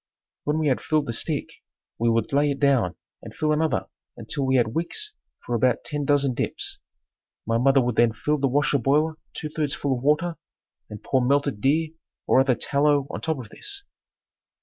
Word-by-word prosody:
When 150 +1 +1
we 155 -1 +1
had 130 - +1
filled 155 -2 +1
the 115 - -3
stick, - - -3 0.4
we 115 +1 +2
would 115 +2 0
lay 145 +1 +3
it 140 -1 -2
down 130 - +2 0.3
and - - -11
fill 155 0 0
another 155 +1 +1 0.3
until 140 -2 -3
we 130 - +3
had 115 -3 +2
wicks 420 - -3 0.3
for 120 - -3
about 120 +1 +2
ten 145 -1 -3
dozen 140 -2 +2
dips. - - -3 0.7
My 115 +1 +1
mother 135 +2 +4
would 125 -2 -1
then 120 -1 +5
fill 150 +6 -1
the 135 - +2
wash 145 +3 +1
boiler 150 +4 +2 0.2
two 155 - -4
thirds 150 -2 -2
full 140 -2 -1
of 120 - -6
water 150 +5 +1 0.5
and 105 - -9
pour 130 -2 +1
melted 140 -3 +1
deer 155 +4 +2 0.4
or - - +4
other 130 -2 +3
tallow 145 +1 +2
on - - -5
top 160 -1 -1
of 120 -5 -8
this. 400 - -6
140 Hz, 195 wpm, -24 LUFS, 125-150 Hz, 0.7 s, then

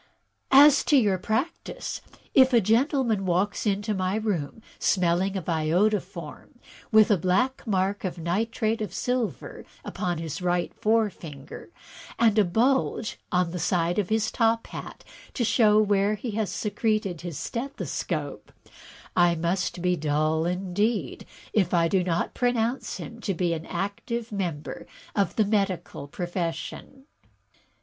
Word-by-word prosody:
As 280 +1 +7
to 290 - +5
your 205 -7 +2
practice, 225 - -3 0.3
if 260 -1 +6
a 235 - +7
gentleman 230 0 +2
walks 190 +4 0
into 205 +1 0
my 185 0 -1
rooms 215 -3 -2 0.2
smelling 185 +1 +1
of 180 - -5
iodoform, 175 - -1 0.3
with 220 -1 +6
a 205 - +5
black 245 +10 0
mark 195 0 0
of 185 -2 -3
nitrate 220 +6 -1
of 200 -4 -4
silver 250 -3 -2 0.2
upon 175 -2 -2
his 160 0 -5
right 175 -1 0
forefinger, 185 -11 -2 0.5
and 225 -2 +4
a - - +6
bulge 225 +4 0
on 180 -2 +1
the 180 - -4
side 175 +2 +1
of 195 - -1
his 220 0 +1
top 230 -1 +1
hat - - -9 0.3
to 245 - 0
show 215 -2 +4
where 205 0 +2
he 220 +3 -5
has 215 -2 -1
secreted 205 -3 -1
his 170 -4 -6
stethoscope, 270 +4 -4 0.6
I 175 -1 +4
must 175 +1 -2
be 180 0 +2
dull, 155 +1 0
indeed, 185 - -1 0.3
if 190 -4 +2
I 165 -1 +3
do 185 +1 +1
not 175 -1 -1
pronounce 245 0 0
him 230 0 -9
to 195 -4 -2
be 170 0 0
an 160 0 -5
active 225 +4 -4
member 175 -7 -4 0.3
of 200 -4 +1
the 215 - +3
medical 195 -8 -1
profession. 175 - -5
195 Hz, 140 wpm, -26 LUFS, 175-225 Hz, 0.6 s, As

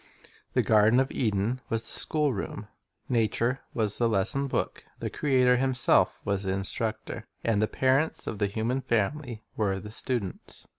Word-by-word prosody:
The - - +4
garden 110 +3 +5
of 135 0 +1
Eden 110 +2 0
was 115 0 +1
the - - 0
schoolroom, 130 -9 0 0.4
nature 120 +1 +1 0.2
was 110 -3 0
the 120 -1 +3
lesson 115 +7 +1
book, - - -2
the - - -4
Creator 130 -3 +3
Himself 130 -1 +2
was 100 -1 0
the 95 -1 -1
instructor, 105 +3 -3 0.2
and 110 -3 +1
the 110 - +2
parents 135 +7 +2
of 105 - -5
the 100 - +2
human 115 +6 -1
family 120 0 -1
were 100 -3 0
the 105 +2 -9
students. 115 -5 -3
115 Hz, 155 wpm, -28 LUFS, 105-130 Hz, 0.4 s, garden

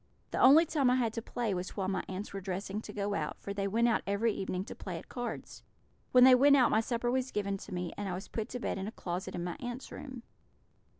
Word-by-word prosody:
The - - -2
only 295 +6 +8
time 290 -5 +2
I 250 - +4
had 235 -4 +1
to 230 - -3
play 230 -2 -2
was 180 +2 -5
while 190 -2 -1
my 195 - -1
aunts 190 +3 -6
were 195 - -4
dressing 195 +2 -4
to - - -8
go 205 0 -2
out, - - -3
for 200 - -5
they 200 0 -1
went 230 +4 +2
out 230 - +2
every 205 +3 +1
evening 190 -1 -3
to - - -7
play 180 -4 -6
at - - -11
cards. 245 -1 -6 0.5
When 250 -1 +7
they 260 0 +9
went 280 +3 +7
out 250 -3 +4
my 220 - +4
supper 240 +1 -1
was 260 0 0
given 200 -3 -1
to 200 - -11
me, 180 -1 -3
and 205 -1 -4
I 180 - -2
was 190 - -7
put 220 -2 -4
to 250 - -5
bed 215 - -2
in 190 - -4
a - - -4
closet 180 -4 -5
in 175 - -3
my 175 -1 -4
aunts' 245 +1 -6
room. 255 -4 -8
210 Hz, 270 wpm, -32 LUFS, 195-245 Hz, 0.5 s, they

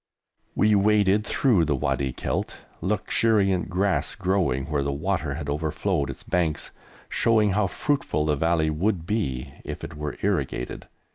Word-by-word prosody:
We 105 0 +4
waded 105 0 +3
through 110 - +3
the 75 -2 +1
Wadi 70 -1 -1
Kelt, - - -3 0.2
luxuriant 100 -1 +1
grass 90 -5 0
growing 90 -9 0
where 75 -1 -1
the 70 0 -1
water 75 -1 -1
had 75 -2 -5
overflowed 75 +2 -1
its - - -7
banks, 80 -4 -1 0.4
showing 110 -3 +3
how 100 0 +2
fruitful 140 - -1
the 75 -1 +2
Valley 80 +1 +1
would 85 +2 0
be 70 - -2
if - - -7
it - - -7
were 75 -1 -5
irrigated. 60 - -2
85 Hz, 145 wpm, -25 LUFS, 75-100 Hz, 0.4 s, We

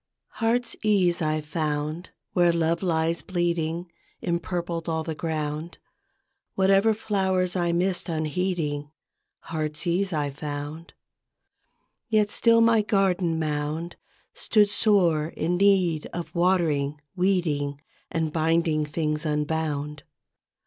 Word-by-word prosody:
TTEARTSEASE 215 -6 +1
I 155 -1 0
found, 155 +2 -3 0.2
where 175 -1 +4
Love 165 0 +1
lies 165 -2 0
bleeding 170 -1 -1 0.3
Empurpled 170 -1 -2
all 160 -1 -1
the 160 - -3
ground; 155 +1 -3 0.8
Whatever 195 +3 +4
flowers 190 -4 0
I 175 -2 +1
missed 180 +1 0
unheeding, 155 -2 -1 0.5
Heartsease 170 +4 -2
I 145 -3 -1
found. 145 +3 -6 1.1
Yet 210 -2 +2
still 230 -1 +4
my 230 -1 +5
garden 190 -5 +1
mound 155 +2 -2 0.4
Stood 210 -2 +2
sore 175 -8 +3
in 175 +3 0
need 185 -5 +3
of 170 -1 -5
watering, 160 -5 +1 0.2
weeding, 165 -7 0 0.3
And 160 -3 -2
binding 160 -1 +2
things 150 0 -2
unbound. 150 -1 -2
170 Hz, 100 wpm, -25 LUFS, 155-185 Hz, 1.1 s, my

